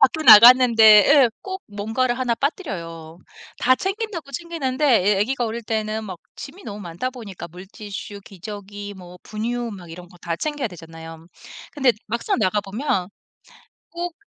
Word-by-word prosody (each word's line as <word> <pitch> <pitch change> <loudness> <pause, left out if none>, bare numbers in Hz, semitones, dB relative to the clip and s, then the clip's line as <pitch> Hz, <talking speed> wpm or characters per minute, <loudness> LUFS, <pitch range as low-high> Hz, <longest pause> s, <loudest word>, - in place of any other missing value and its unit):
밖에 305 +3 +3
나갔는데 235 +1 +8 0.3
예 280 -4 +6
꼭 380 0 -7
뭔가를 225 +5 -2
1 245 -2 0
빠뜨려요. 170 - -5 0.4
다 255 - +4
챙긴다고 385 -6 -4
챙기는데 300 -3 -3 0.3
애 - - 0
아기가 245 +3 0
어릴 230 +1 -5
때는 220 0 -3
막 185 -4 -8 0.2
짐이 350 +8 -10
너무 205 -1 -7
많다 175 +8 -5
보니까 210 -9 -9
물티슈, 200 +3 -9
기저귀, 205 +1 -9
뭐 180 -1 -13
분유 235 +2 -4
막 175 -4 -11
이런 175 +1 -11
거 175 - -18
다 170 -1 -3
챙겨야 295 - -3
되잖아요. 165 -2 -12 0.5
근데 270 -5 +2
막상 235 +3 -2
나가 210 0 +1
보면 195 -2 -2 0.8
꼭 345 0 -5
220 Hz, 300 characters per minute, -22 LUFS, 190-260 Hz, 0.8 s, 나갔는데